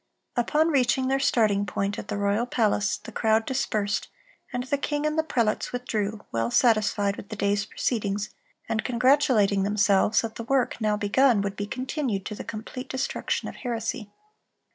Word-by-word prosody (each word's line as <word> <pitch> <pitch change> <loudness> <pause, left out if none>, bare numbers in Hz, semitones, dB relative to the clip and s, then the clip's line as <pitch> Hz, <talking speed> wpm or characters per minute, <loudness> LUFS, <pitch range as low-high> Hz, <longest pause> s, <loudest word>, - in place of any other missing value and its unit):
Upon 300 +6 +2
reaching 260 -2 +2
their 270 0 +2
starting 220 -7 +2
point 200 +1 -2
at - - -7
the - - -3
royal 205 +4 +1
palace, 210 -4 +1
the - - -11
crowd 220 0 +2
dispersed, 215 -6 -1 0.4
and 245 -1 -2
the 275 +2 -1
king 295 +1 -1
and 305 0 0
the 320 - +3
prelates 235 -9 0
withdrew, 220 -4 -3
well 115 0 0
satisfied 210 - +2
with 200 - -9
the 215 - -5
day's 205 0 0
proceedings, 210 -4 -2 0.4
and 220 - -1
congratulating 245 -5 +3
themselves 205 +1 +3
that 225 -1 -6
the 230 - -4
work 255 -1 0
now 210 -1 +1
begun 225 +2 +3
would 200 0 -3
be 205 0 -4
continued 255 -4 -3
to - - -4
the - - -6
complete 235 +4 -7
destruction 260 0 -2
of - - -8
heresy. 230 -2 -3
220 Hz, 170 wpm, -26 LUFS, 205-255 Hz, 0.4 s, the